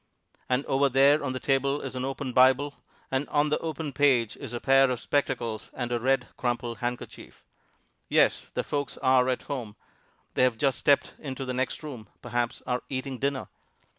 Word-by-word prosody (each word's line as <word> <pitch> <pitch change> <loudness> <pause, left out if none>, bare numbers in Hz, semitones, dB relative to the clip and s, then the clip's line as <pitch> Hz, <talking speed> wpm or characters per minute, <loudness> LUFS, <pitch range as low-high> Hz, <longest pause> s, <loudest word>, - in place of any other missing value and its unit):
And 130 +2 +1
over 140 +1 +2
there 140 +3 +5
on 130 -2 -2
the 130 - -3
table 135 +1 +1
is - - -6
an 130 0 -2
open 135 -1 -4
Bible, 130 +3 +4 0.4
and 135 +2 -1
on 150 0 +2
the 150 - +1
open 160 -3 -4
page 130 -5 +3
is - - -8
a 120 - -3
pair 135 +1 +5
of 125 -2 -1
spectacles 120 -5 -1
and 120 -2 -3
a 120 - +1
red, 135 +3 +1
crumpled 120 -3 -2
handkerchief. 120 0 -6 0.7
Yes, - - +3
the - - 0
folks 145 -1 -3
are 130 -1 +3
at 130 - -1
home: 120 -8 -5 0.6
they - - +1
have 125 -3 +3
just 135 +1 +1
stepped 140 -1 +3
into 135 -2 -5
the 130 - -3
next 130 +4 -2
room 125 -9 -8
perhaps 120 0 -2
are 125 0 -1
eating 130 -1 -4
dinner. 140 -1 -1
130 Hz, 185 wpm, -27 LUFS, 125-140 Hz, 0.7 s, there